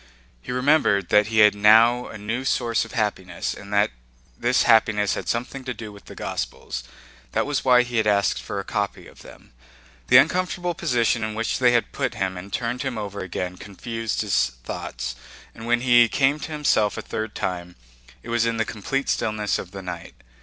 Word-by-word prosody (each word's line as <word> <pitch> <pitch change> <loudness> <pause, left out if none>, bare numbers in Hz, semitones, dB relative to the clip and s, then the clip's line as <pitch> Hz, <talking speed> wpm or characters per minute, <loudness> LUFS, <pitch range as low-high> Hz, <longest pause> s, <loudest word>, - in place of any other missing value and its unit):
He - - -7
remembered 125 - +2
that 105 0 +4
he 110 -1 +3
had 105 -1 +7
now 110 +4 +5
a - - -8
new 110 +5 -3
source 120 -4 0
of 115 - -13
happiness 100 -6 -2
and 100 0 -11
that 105 0 +3 0.4
this 120 - +2
happiness 110 -3 +3
had - - -5
something 125 +3 -3
to 125 -2 -4
do 110 -2 -8
with 100 0 -15
the - - -11
Gospels. 65 - -5 0.5
That - - +1
was 145 -1 -1
why 125 -1 +5
he 120 -2 0
asked 100 -3 +1
for - - -5
a - - -4
copy - - -3
of - - -15
them. - - -15 0.5
The - - +7
uncomfortable 180 -1 +2
position 120 -9 +1
in 110 0 -3
which 115 +1 -1
they 125 -2 +4
had 120 - +1
put - - -2
him 95 -1 -2
and 95 +2 -9
turned 120 +3 -2
him 120 - -3
over 100 -1 -5
again 90 0 -4
confused 115 +3 -4
his 65 - +1
thoughts, - - -5 0.4
and 115 +1 -9
when 120 0 +2
he 120 -2 +5
came 140 +4 +2
to 155 - -7
himself 140 -9 +1
a - - -5
third 110 -1 -5
time 90 -1 -4 0.5
it - - -10
was 120 -1 +1
in 115 -1 -1
the 110 - +1
complete 135 +7 -3
stillness 105 -1 0
of 90 - -7
the 95 0 -9
night. 90 -2 -7
110 Hz, 195 wpm, -23 LUFS, 100-125 Hz, 0.5 s, had